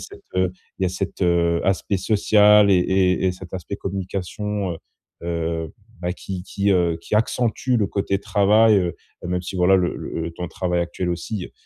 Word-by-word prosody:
cet, -, -, -11 dB
heu, 95 Hz, -1 st, +2 dB, 0.3 s
il -, -, -3 dB
y 95 Hz, -, +3 dB
a -, -, +1 dB
cet, 95 Hz, +1 st, -4 dB
heu, 85 Hz, -1 st, +2 dB
aspect 95 Hz, +1 st, 0 dB
social 105 Hz, 0 st, +5 dB
et -, -, +6 dB
et 95 Hz, 0 st, +2 dB
et 90 Hz, -, +2 dB
cet 95 Hz, 0 st, -10 dB
aspect 95 Hz, +2 st, -5 dB
communication, 100 Hz, +1 st, -3 dB
heu -, -, -6 dB, 0.5 s
heu, 85 Hz, -1 st, -3 dB, 0.3 s
bah, 90 Hz, +1 st, -1 dB
qui 95 Hz, -1 st, -6 dB
qui, 100 Hz, +1 st, -1 dB
heu, 85 Hz, -3 st, +1 dB
qui 105 Hz, -, -4 dB
accentue 120 Hz, +2 st, +1 dB
le 100 Hz, -, +1 dB
côté 100 Hz, +1 st, -1 dB
travail, 105 Hz, +2 st, +4 dB
heu 90 Hz, -3 st, 0 dB, 0.3 s
même 90 Hz, 0 st, -1 dB
si, 95 Hz, +1 st, -6 dB
voilà, 90 Hz, +2 st, +5 dB
le 90 Hz, -1 st, 0 dB
le 80 Hz, 0 st, -4 dB
temps 90 Hz, -, -6 dB
de 85 Hz, -, -5 dB
travail 90 Hz, -1 st, -1 dB
actuel 85 Hz, +1 st, -3 dB
aussi, 90 Hz, +3 st, -4 dB
heu, -, -, -19 dB
95 Hz, 195 wpm, -22 LUFS, 85-100 Hz, 0.5 s, et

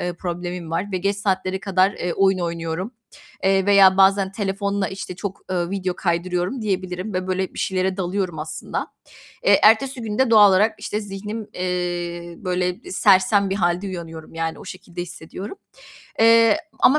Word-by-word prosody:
eee, 175 Hz, -, -2 dB
problemim 175 Hz, -1 st, -5 dB
var 185 Hz, +5 st, -2 dB
ve 185 Hz, -, 0 dB
geç 200 Hz, +2 st, 0 dB
saatlere 190 Hz, -1 st, -1 dB
kadar, 195 Hz, -1 st, +2 dB
eee, 175 Hz, -3 st, -3 dB
oyun 195 Hz, +1 st, +2 dB
oynuyorum. 170 Hz, +4 st, -3 dB, 0.5 s
Eee, 195 Hz, 0 st, +3 dB
veya 195 Hz, -2 st, +6 dB
bazen 195 Hz, 0 st, +4 dB
telefonla, 200 Hz, 0 st, -1 dB
işte, 190 Hz, -2 st, -7 dB
çok, 195 Hz, 0 st, -5 dB
eee, 175 Hz, -1 st, -1 dB
video 190 Hz, -2 st, -2 dB
kaydırıyorum 180 Hz, +6 st, -1 dB
diyebilirim 185 Hz, 0 st, -3 dB
ve, 185 Hz, 0 st, -2 dB
böyle, 185 Hz, 0 st, -2 dB
bir -, -, -9 dB
şeylere 185 Hz, 0 st, 0 dB
dalıyorum 185 Hz, -2 st, -2 dB
aslında. 155 Hz, +1 st, -4 dB, 0.6 s
Eee, -, -, +5 dB
ertesi 245 Hz, +5 st, +4 dB
gün 215 Hz, -2 st, -4 dB
de 260 Hz, -2 st, +3 dB
doğal 210 Hz, -2 st, +8 dB
olarak, 210 Hz, +4 st, +3 dB
işte, 210 Hz, -, -3 dB
zihnim, 210 Hz, +2 st, -6 dB
eee, 175 Hz, -1 st, -3 dB
böyle, 180 Hz, -, -2 dB
sersem 200 Hz, -, +4 dB
bir -, -, 0 dB
halde 175 Hz, +1 st, 0 dB
uyanıyorum, 165 Hz, -4 st, -8 dB
yani 165 Hz, 0 st, -3 dB
o -, -, -11 dB
şekilde 180 Hz, -2 st, -7 dB
hissediyorum. 180 Hz, -, -8 dB, 0.6 s
Eee, 230 Hz, -1 st, +6 dB, 0.2 s
ama 295 Hz, +4 st, +6 dB
190 Hz, 165 wpm, -22 LUFS, 180-200 Hz, 0.6 s, doğal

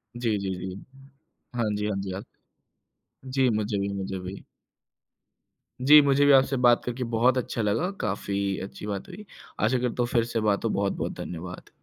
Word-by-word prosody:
जी, 115 Hz, -3 st, 0 dB
जी, 95 Hz, -, -3 dB
जी। 95 Hz, 0 st, -5 dB, 0.8 s
हाँ 120 Hz, -, +1 dB
जी, 105 Hz, 0 st, -1 dB
हाँ 105 Hz, -, -1 dB
जी, 95 Hz, -, -5 dB
आक -, -, -8 dB, 1.1 s
जी, 130 Hz, -2 st, +4 dB
मुझे 105 Hz, -1 st, -1 dB
भी 100 Hz, 0 st, -1 dB
मुझे 95 Hz, -1 st, -4 dB
भी। 90 Hz, +2 st, -8 dB, 1.4 s
जी, 150 Hz, +3 st, +9 dB
मुझे 140 Hz, 0 st, +3 dB
भी 145 Hz, -, +6 dB
आपसे 135 Hz, 0 st, +5 dB
बात 120 Hz, -1 st, +5 dB
करके 125 Hz, +1 st, -3 dB
बहुत 125 Hz, +3 st, +4 dB
अच्छा 120 Hz, -1 st, -2 dB
लगा, 110 Hz, -, +1 dB
काफ़ी 100 Hz, -1 st, -1 dB
अच्छी 100 Hz, -, -8 dB
बात 100 Hz, -2 st, -4 dB
हुई। 210 Hz, +4 st, -10 dB, 0.3 s
आशा 110 Hz, +5 st, +2 dB
करता 125 Hz, 0 st, 0 dB
हूँ, -, -, -1 dB
फिर 115 Hz, -1 st, +3 dB
से 115 Hz, -1 st, -2 dB
बात 105 Hz, -2 st, +1 dB
हो। -, -, +2 dB
बहुत-बहुत 100 Hz, -1 st, -1 dB
धन्यवाद। 90 Hz, +1 st, -7 dB
110 Hz, 180 wpm, -26 LUFS, 100-125 Hz, 1.4 s, जी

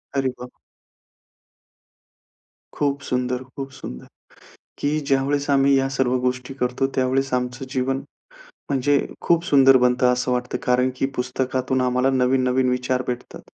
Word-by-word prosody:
अरे 135 Hz, -1 st, +1 dB
वाह! 125 Hz, 0 st, -9 dB, 2.2 s
खूप 140 Hz, -1 st, 0 dB
सुंदर, 125 Hz, -1 st, -2 dB
खूप 135 Hz, +1 st, -8 dB
सुंदर, 65 Hz, -, -9 dB, 0.7 s
की 150 Hz, +2 st, 0 dB
ज्यावेळेस 140 Hz, +1 st, +1 dB
आम्ही 140 Hz, 0 st, +4 dB
या 135 Hz, 0 st, +1 dB
सर्व 130 Hz, -2 st, 0 dB
गोष्टी 125 Hz, +1 st, -2 dB
करतो, 125 Hz, +2 st, 0 dB
त्यावेळेस 130 Hz, +1 st, 0 dB
आमचं 125 Hz, +1 st, -2 dB
जीवन, 130 Hz, 0 st, -1 dB, 0.7 s
म्हणजे 140 Hz, +1 st, +2 dB, 0.2 s
खूप 170 Hz, 0 st, +2 dB
सुंदर 135 Hz, -5 st, +6 dB
बनतं, 125 Hz, 0 st, +3 dB
असं 125 Hz, 0 st, -1 dB
वाटतं. 125 Hz, 0 st, -2 dB
कारण 125 Hz, +1 st, +2 dB
की 135 Hz, -, 0 dB
पुस्तकातून 130 Hz, +1 st, -1 dB
आम्हाला 125 Hz, +1 st, +2 dB
नवीन-नवीन 130 Hz, 0 st, +2 dB
विचार 125 Hz, 0 st, 0 dB
भेटतात. 125 Hz, 0 st, -5 dB
130 Hz, 130 wpm, -22 LUFS, 125-135 Hz, 2.2 s, सुंदर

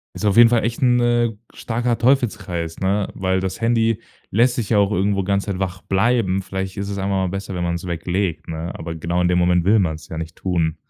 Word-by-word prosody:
Ist -, -, -6 dB
auf 100 Hz, 0 st, +2 dB
jeden 120 Hz, -1 st, +9 dB
Fall 120 Hz, -2 st, +2 dB
echt 115 Hz, +2 st, -2 dB
'n, 125 Hz, -1 st, +4 dB
äh, 120 Hz, -1 st, +2 dB, 0.2 s
starker 120 Hz, 0 st, -1 dB
Teufelskreis, 105 Hz, -10 st, 0 dB
ne, 100 Hz, +1 st, 0 dB
weil 95 Hz, 0 st, 0 dB
das 95 Hz, +3 st, -4 dB
Handy 115 Hz, -1 st, +2 dB, 0.3 s
lässt 120 Hz, +4 st, +3 dB
dich 115 Hz, -5 st, -3 dB
ja 110 Hz, -, +4 dB
auch 100 Hz, -1 st, +3 dB
irgendwo 100 Hz, 0 st, +1 dB
ganze 100 Hz, +1 st, 0 dB
Zeit 100 Hz, -2 st, -3 dB
wach 95 Hz, -1 st, -3 dB
bleiben. 95 Hz, -1 st, +1 dB
Vielleicht 95 Hz, 0 st, -5 dB
ist 100 Hz, 0 st, -3 dB
es 100 Hz, -1 st, -4 dB
einfach 95 Hz, +1 st, -2 dB
mal 95 Hz, -1 st, 0 dB
besser, 95 Hz, +1 st, -5 dB
wenn 90 Hz, -, -2 dB
man's 85 Hz, +1 st, -2 dB
weglegt, 85 Hz, +1 st, -2 dB
ne? 80 Hz, +1 st, -4 dB
Aber 80 Hz, 0 st, -6 dB
genau 85 Hz, +2 st, -2 dB
in 90 Hz, -, +2 dB
dem 90 Hz, 0 st, +2 dB
Moment 90 Hz, -1 st, +3 dB
will 105 Hz, +4 st, +4 dB
man's 80 Hz, -5 st, -2 dB
ja 80 Hz, -, -7 dB
nicht 80 Hz, +1 st, -6 dB
tun. 85 Hz, -3 st, -1 dB
95 Hz, 230 wpm, -21 LUFS, 90-115 Hz, 0.3 s, jeden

